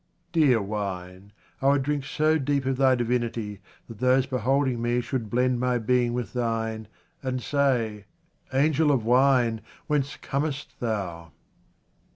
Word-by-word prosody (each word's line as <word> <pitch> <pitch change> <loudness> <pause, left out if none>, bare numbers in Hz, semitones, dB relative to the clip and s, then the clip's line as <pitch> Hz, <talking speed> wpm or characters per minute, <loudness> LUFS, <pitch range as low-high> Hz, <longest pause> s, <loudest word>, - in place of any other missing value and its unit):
Dear 140 - +3
wine, 95 -2 -5 0.3
I 135 - +2
would 140 -1 +4
drink 145 -1 -1
so 155 0 +1
deep 140 -1 0
of 130 -1 0
thy 130 -1 +4
divinity 120 -4 -2 0.3
that 115 -3 -11
those 130 +1 +3
beholding 130 -1 0
me 120 +1 +1
should 120 -3 -3
blend 125 +1 +1
my 125 0 +1
being 120 +1 +1
with 125 -2 -4
thine, 115 -2 -2 0.3
and 130 -2 -2
say, 120 -7 0 0.2
" - - -37
Angel 150 +3 +3
of 125 -6 +1
wine, 125 -2 +3 0.2
whence 140 -2 0
comest 145 0 -3
thou 90 - -4
125 Hz, 145 wpm, -26 LUFS, 115-135 Hz, 0.3 s, would